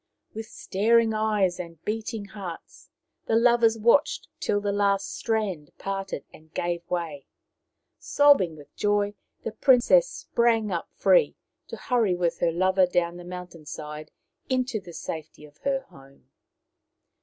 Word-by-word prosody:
With 220 0 -6
staring 225 +2 +2
eyes 210 -4 +1
and 170 -2 -7
beating 220 -1 -3
hearts 190 -4 -9 0.4
the 225 - +2
lovers 230 -1 +4
watched 235 +6 +3
it - - -39
till 205 - +1
the 205 0 -1
last 200 -1 +1
strand 200 - -2
parted 195 -6 -4
and 155 0 -17
gave 175 0 -1
way. 165 -5 -3 0.7
Sobbing 280 - +4
with 145 -1 -15
joy, 205 0 +1 0.3
the 225 - -3
princess 265 - +4
sprang 225 -3 +1
up 170 -2 -3
free, - - +3 0.3
to - - -7
hurry 230 -7 +1
with 175 -1 -1
her 170 - +2
lover 185 +2 +3
down 175 -1 0
the 175 - -9
mountain 180 -3 -9
side 150 0 -7 0.4
into 255 -3 0
the 180 -3 -12
safety 160 -2 -7
of 145 0 -18
her 275 -1 0
home. 135 0 -18
195 Hz, 145 wpm, -26 LUFS, 170-225 Hz, 0.7 s, lovers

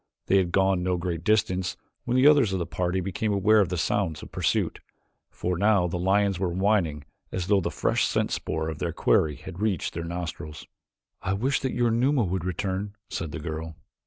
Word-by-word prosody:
They 95 - +3
had 90 -2 +1
gone 95 -1 +2
no 90 0 0
great 85 -2 -3
distance 95 -4 +1 0.3
when 125 +1 +1
the 130 - +4
others 145 -8 +6
of - - +1
the 85 - -2
party 90 +2 -1
became 100 +4 -2
aware 105 +2 +4
of 95 -4 +2
the 90 - -2
sounds 85 -2 -1
of - - -11
pursuit, - - 0 0.5
for 90 -1 -3
now 100 -2 +4
the 90 0 -2
lions 95 0 +2
were 95 -1 0
whining 90 -5 +1 0.3
as 90 -2 -2
though 100 0 +3
the - - -1
fresh - - +1
scent - - 0
spoor 80 +1 -2
of 80 -2 -5
their 85 -2 -2
quarry 75 -2 +2
had 95 +4 -9
reached 105 -6 0
their 85 - -4
nostrils. 85 -3 -6 0.6
"I 95 - -1
wish 130 +7 +1
that 130 - -2
your 120 -2 +2
Numa 125 +3 +2
would 90 -2 -2
return," 95 +3 -3 0.2
said 80 -2 -3
the - - -5
girl. 80 0 -5
95 Hz, 205 wpm, -26 LUFS, 85-105 Hz, 0.6 s, others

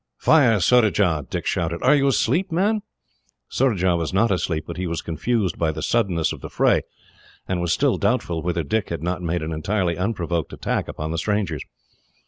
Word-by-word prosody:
"Fire, 125 -9 +4
Surajah!" 95 - +3
Dick - - -4
shouted. 85 0 -1
"Are - - +5
you 140 -1 +3
asleep, 175 +7 +1
man?" 205 +6 +1 0.7
Surajah 95 -9 +1
was 85 -2 -2
not 100 +4 +2
asleep, 85 -4 -1
but - - -7
he 90 0 -2
was 85 0 -2
confused 95 +3 -1
by 80 -2 +1
the - - -6
suddenness 95 -9 +1
of - - -10
the - - -7
fray, - - +2 0.7
and 90 -2 -1
was 85 -1 0
still - - +2
doubtful 85 -2 0
whether 85 0 -1
Dick 100 +9 -1
had 85 -1 -4
not 90 +1 -2
made 85 -1 -2
an 80 - -4
entirely 85 +2 -1
unprovoked 85 -5 -2
attack - - -2
upon 80 +1 -5
the 85 - -2
strangers. 100 -6 -1
90 Hz, 185 wpm, -22 LUFS, 85-110 Hz, 0.7 s, Are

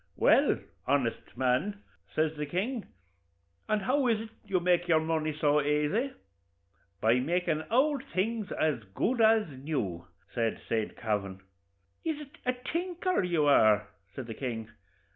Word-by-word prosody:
'Well, - - +4 0.3
honest 130 -4 0
man,' 130 +12 0 0.3
says 155 0 +1
the 150 -1 -3
king, 205 - -2 0.8
'and 215 -2 +1
how 265 +4 +2
is 225 -3 +2
it 225 - -8
you 195 -4 0
make 175 0 +2
your 160 -2 +5
money 160 -1 0
so 150 0 +2
aisy?' 150 - +1 0.9
'By 115 +3 +4
makin' 165 +2 0
ould 270 +2 +3
things 220 -2 -2
as 150 -7 0
good 240 0 +1
as 220 -1 +5
new,' 130 - -3 0.3
says 115 -2 0
Saint 110 -2 -1
Kavin. 100 -4 -2 0.6
'Is 320 -2 -1
it 295 -2 -12
a 250 - +3 0.2
tinker 360 - 0
you 170 -5 +1
are?' 110 -7 +5 0.3
says 130 - -5
the 115 - -6
king. 115 -3 -4
160 Hz, 145 wpm, -30 LUFS, -, 0.9 s, your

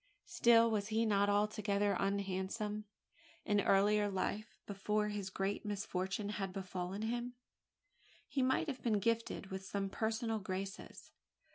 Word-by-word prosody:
Still 230 -8 +5
was 205 -2 0
he 225 +1 +1
not 200 -1 +3
altogether 205 -1 +2
unhandsome; 200 +2 -1 0.6
and 205 -2 +3
in - - 0
earlier 205 +1 +4
life 205 +3 -3
before 210 +1 0
his 205 -2 -3
great 195 +1 -2
misfortune 200 -1 -2
had 195 -2 -3
befallen 185 +1 -4
him 240 +2 -2 0.9
he 275 - -1
might 260 +5 +2
have 265 -4 -4
been 220 -3 +2
gifted 230 -2 -1
with 190 0 -4
some 195 0 -3
personal 225 +1 -1
graces. 190 0 -6
205 Hz, 135 wpm, -36 LUFS, 195-220 Hz, 0.9 s, Still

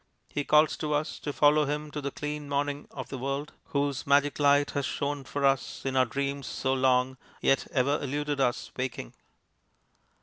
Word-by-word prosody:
He 145 - -1
calls 150 +2 +4
to 150 -1 -1
us 150 +1 -2
to 145 - -3
follow 150 +1 +4
him 150 +1 -3
to 150 - -4
the 140 - -2
clean 150 +1 -5
morning 145 0 -1
of 130 - -7
the 135 - -5
world, 140 +3 -3
whose 140 -2 -1
magic 145 +1 +3
light 145 0 +4
has 140 - -1
shone 140 0 -2
for 140 +1 -1
us 135 0 0
in 135 -1 -1
our 130 -1 +5
dreams 140 +2 -3
so 130 0 -1
long, 130 0 +2 0.2
yet 135 - +2
ever 140 +2 +2
eluded 145 +1 -2
us 125 -1 0
waking. 125 - -4
140 Hz, 180 wpm, -28 LUFS, 135-145 Hz, 0.2 s, our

